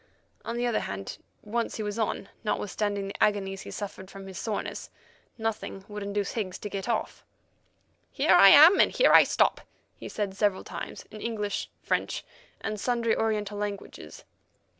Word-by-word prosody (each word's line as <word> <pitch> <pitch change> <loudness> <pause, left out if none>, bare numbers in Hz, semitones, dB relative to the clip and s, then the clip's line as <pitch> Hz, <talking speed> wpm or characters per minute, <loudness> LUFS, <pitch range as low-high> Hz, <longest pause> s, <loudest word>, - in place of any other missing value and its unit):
On 235 - -4
the 240 - 0
other 240 -2 +1
hand, 100 0 -6 0.2
once 230 +2 -2
he 220 - -3
was 210 +2 -4
on, 215 -2 -2
notwithstanding 205 -1 -1
the - - -1
agonies 195 -2 0
he - - -9
suffered 195 -2 -7
from 195 -1 -10
his 190 -1 -8
soreness, 215 -2 -4 0.5
nothing 220 -3 -4
would 210 0 -7
induce 200 0 -2
Higgs 195 -5 -3
to 210 - -7
get 195 +3 -4
off. 230 - -2 0.9
"Here - - +3
I 195 - +9
am 315 - +9
and - - +5
here - - +4
I - - +10
stop," - - +2 0.3
he - - -9
said 200 -3 -3
several 200 -2 +1
times, - - -7
in 215 - -9
English, 210 -3 -3
French, - - -1 0.4
and 215 - -3
sundry 235 0 +1
Oriental 210 -2 -1
languages. 205 -1 -6
210 Hz, 165 wpm, -28 LUFS, 195-225 Hz, 0.9 s, I